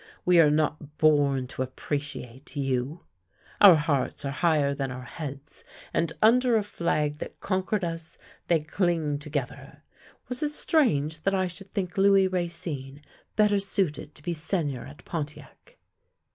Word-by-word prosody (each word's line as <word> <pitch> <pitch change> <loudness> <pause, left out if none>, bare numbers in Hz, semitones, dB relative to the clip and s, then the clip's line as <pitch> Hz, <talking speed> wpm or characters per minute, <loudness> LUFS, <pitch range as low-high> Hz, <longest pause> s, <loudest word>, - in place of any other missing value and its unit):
We 180 -1 +5
are 155 -3 +7
not 150 0 -1
born 145 -4 +3
to - - -5
appreciate 130 0 -5
you. 135 +2 -2 0.6
Our 195 -4 +10
hearts 150 -2 -1
are 140 - -1
higher 150 -2 +2
than 135 -1 -3
our 125 0 -7
heads, 140 +2 -6 0.3
and, 165 -1 +1
under 245 +2 +5
a 215 - +3
flag 150 -6 -1
that - - -7
conquered 190 +1 -1
us, 165 -1 -4 0.3
they 165 -3 +3
cling 160 -3 0
together. 145 -1 -5 0.4
Was 250 0 -3
it 300 - +1
strange 160 - +1
that 195 +3 +1
I 185 -1 +2
should 185 +2 -8
think 190 -1 -3
Louis 195 -1 +5
Racine 165 -6 -4 0.3
better 210 -1 +4
suited 180 -7 -1
to 150 - -12
be 175 - -1
Seigneur 155 -6 -1
at 140 +2 -14
Pontiac?" 165 - -7
155 Hz, 145 wpm, -27 LUFS, 145-185 Hz, 0.6 s, Our